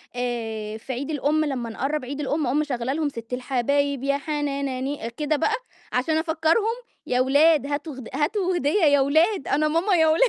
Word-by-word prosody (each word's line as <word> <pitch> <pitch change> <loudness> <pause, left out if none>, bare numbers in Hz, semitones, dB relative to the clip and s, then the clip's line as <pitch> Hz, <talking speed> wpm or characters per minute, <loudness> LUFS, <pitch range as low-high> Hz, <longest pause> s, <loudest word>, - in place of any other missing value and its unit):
آآ، 225 -3 -3
في 260 +4 -6
عيد 270 +5 -4
الأم 300 +2 +1
لمّا 250 -5 -3
نقرّب 270 +4 -2
عيد 280 +3 -5
الأم 295 +1 -1
أقوم 270 +5 +1
مشغلّة 260 -3 -1
لهم: 305 -1 0
"ست 230 -1 -8
الحبايب 275 +2 0
يا 280 0 +1
حنان 280 -3 -2
ني" 270 -4 -3
كده 300 0 +1
بقى 430 +9 +1 0.4
عشان 310 +6 +1
أفكّرهم: 325 +8 +1 0.3
"يا 250 0 +1
ولاد 285 +2 +4
هاتوا 290 +1 -3
غد 260 -3 -9
هاتوا 355 +5 0
هدية 325 +6 +1
يا 285 -2 +5
ولاد 315 +6 +2
أنا 305 +2 +2
ماما 345 +5 +2
يا 320 -1 +4
ولا" 320 +10 +5
285 Hz, 185 wpm, -24 LUFS, 260-315 Hz, 0.4 s, يا